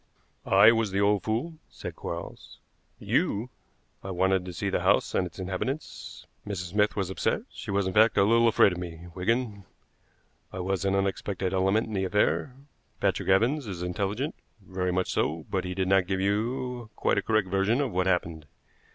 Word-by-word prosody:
"I 100 Hz, +3 st, +7 dB
was 115 Hz, -2 st, +1 dB
the 95 Hz, +1 st, -1 dB
old 100 Hz, -1 st, +3 dB
fool," 125 Hz, +9 st, -3 dB
said -, -, -8 dB
Quarles. 85 Hz, 0 st, -7 dB, 0.4 s
"You?" 115 Hz, +5 st, 0 dB, 0.5 s
"I 95 Hz, -, -6 dB
wanted 95 Hz, 0 st, +1 dB
to 90 Hz, -, -6 dB
see 85 Hz, -, -3 dB
the -, -, +1 dB
house -, -, +2 dB
and 90 Hz, -, +1 dB
its 85 Hz, -, -15 dB
inhabitants. 95 Hz, +10 st, -5 dB, 0.2 s
Mrs. 90 Hz, -4 st, -5 dB
Smith 105 Hz, +1 st, +2 dB
was 95 Hz, -3 st, -2 dB
upset; -, -, -1 dB
she -, -, -9 dB
was, 100 Hz, 0 st, +1 dB
in 95 Hz, -, -2 dB
fact, 110 Hz, +2 st, +5 dB
a -, -, +6 dB
little 115 Hz, +3 st, +4 dB
afraid 105 Hz, -3 st, +5 dB
of 90 Hz, -, -5 dB
me, 85 Hz, -1 st, -7 dB
Wigan. 105 Hz, +2 st, -1 dB, 0.9 s
I -, -, -8 dB
was 95 Hz, +1 st, -1 dB
an 95 Hz, 0 st, +2 dB
unexpected 95 Hz, -1 st, -1 dB
element 95 Hz, +4 st, +2 dB
in 110 Hz, -, -8 dB
the 95 Hz, -1 st, 0 dB
affair. 105 Hz, +6 st, +1 dB, 0.4 s
Patrick -, -, 0 dB
Evans 120 Hz, +8 st, +2 dB
is 90 Hz, -3 st, -5 dB
intelligent 100 Hz, -, -2 dB, 0.3 s
very 95 Hz, -2 st, -3 dB
much 95 Hz, +1 st, 0 dB
so; 80 Hz, +1 st, -1 dB
but 95 Hz, -1 st, -1 dB
he 90 Hz, 0 st, -4 dB
did 95 Hz, 0 st, 0 dB
not 95 Hz, -1 st, +3 dB
give 95 Hz, 0 st, -1 dB
you 120 Hz, +4 st, -1 dB
quite -, -, +1 dB
a -, -, -2 dB
correct 110 Hz, -1 st, +1 dB
version 100 Hz, +6 st, +2 dB
of 140 Hz, -5 st, 0 dB
what 90 Hz, 0 st, 0 dB
happened. 85 Hz, -4 st, -1 dB
95 Hz, 185 wpm, -27 LUFS, 95-110 Hz, 0.9 s, I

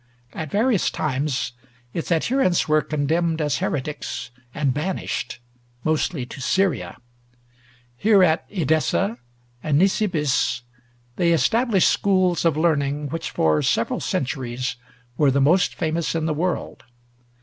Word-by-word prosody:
At 155 Hz, -2 st, -5 dB
various 215 Hz, -, +2 dB
times 135 Hz, -3 st, -2 dB, 0.4 s
its 165 Hz, -, -4 dB
adherents 185 Hz, +2 st, +2 dB
were 155 Hz, 0 st, +3 dB
condemned 160 Hz, +3 st, 0 dB
as 150 Hz, -2 st, 0 dB
heretics 130 Hz, -4 st, -3 dB, 0.2 s
and 140 Hz, -1 st, 0 dB
banished, 165 Hz, +7 st, -3 dB, 0.5 s
mostly 155 Hz, -3 st, 0 dB
to 130 Hz, -, -10 dB
Syria. 190 Hz, +2 st, 0 dB, 1.0 s
Here, 205 Hz, -, +5 dB
at 165 Hz, -2 st, +3 dB
Edessa 175 Hz, -, 0 dB, 0.4 s
and 150 Hz, -2 st, +1 dB
Nisibis, 165 Hz, -, +1 dB, 0.5 s
they 170 Hz, -1 st, +3 dB
established 220 Hz, -, +3 dB
schools 185 Hz, -4 st, +2 dB
of 160 Hz, -3 st, +2 dB
learning 145 Hz, -3 st, +1 dB
which 165 Hz, +2 st, -4 dB
for 80 Hz, -1 st, +2 dB
several -, -, 0 dB
centuries 125 Hz, -2 st, -2 dB, 0.4 s
were 145 Hz, -2 st, +4 dB
the 135 Hz, +1 st, +2 dB
most 165 Hz, +7 st, +3 dB
famous 165 Hz, 0 st, -1 dB
in 160 Hz, -1 st, 0 dB
the 160 Hz, -, 0 dB
world. 175 Hz, +4 st, -3 dB
155 Hz, 120 wpm, -23 LUFS, 140-180 Hz, 1.0 s, Here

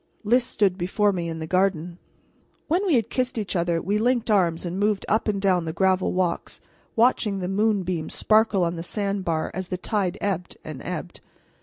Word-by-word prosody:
Lys 240 Hz, +4 st, +3 dB
stood 200 Hz, -6 st, 0 dB
before 200 Hz, +3 st, +1 dB
me 170 Hz, -2 st, -3 dB
in 165 Hz, -, -4 dB
the 160 Hz, -, -4 dB
garden. 180 Hz, -1 st, 0 dB, 0.7 s
When 350 Hz, +5 st, +1 dB
we 330 Hz, -, +4 dB
had 230 Hz, -2 st, 0 dB
kissed 255 Hz, -1 st, -1 dB
each 205 Hz, -3 st, -3 dB
other, 170 Hz, -1 st, +1 dB
we 200 Hz, +5 st, 0 dB
linked 240 Hz, 0 st, +1 dB
arms 175 Hz, -4 st, +2 dB
and 175 Hz, +2 st, -3 dB
moved 205 Hz, -1 st, +1 dB
up 215 Hz, +2 st, +1 dB
and 205 Hz, -2 st, 0 dB
down 185 Hz, -3 st, +2 dB
the 160 Hz, -, -3 dB
gravel 190 Hz, +1 st, +2 dB
walks, 180 Hz, -2 st, -2 dB, 0.4 s
watching 225 Hz, -3 st, +2 dB
the 180 Hz, -2 st, -3 dB
moonbeams 190 Hz, -5 st, 0 dB
sparkle 215 Hz, -4 st, +3 dB
on 170 Hz, 0 st, -2 dB
the -, -, -4 dB
sand 200 Hz, +1 st, -2 dB
bar 160 Hz, -2 st, -1 dB
as 185 Hz, 0 st, -4 dB
the 185 Hz, -, -3 dB
tide 185 Hz, -1 st, -1 dB
ebbed 185 Hz, -3 st, -3 dB
and -, -, -7 dB
ebbed. -, -, -6 dB
195 Hz, 195 wpm, -24 LUFS, 175-215 Hz, 0.7 s, we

